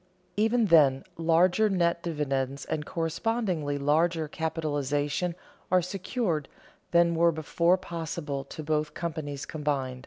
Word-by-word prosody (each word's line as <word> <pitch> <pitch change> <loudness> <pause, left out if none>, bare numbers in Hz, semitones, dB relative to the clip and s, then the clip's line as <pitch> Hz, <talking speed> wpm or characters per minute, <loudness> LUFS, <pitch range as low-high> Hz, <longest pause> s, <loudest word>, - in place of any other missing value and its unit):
Even 225 +2 +3
then, 145 -7 +5
larger 175 +6 +3
net 170 -3 +1
dividends 140 -4 -2
and 150 -1 -3
correspondingly 165 -3 -1
larger 160 +3 +1
capitalization 150 +1 -1 0.4
are 185 -1 +4
secured 180 - -2 0.4
than 170 0 +4
were 170 +1 +4
before 170 +3 +2
possible 165 -5 -4
to 155 - -8
both 150 0 -1
companies 155 -4 -4
combined. 140 -5 -2
160 Hz, 115 wpm, -28 LUFS, 145-175 Hz, 0.4 s, then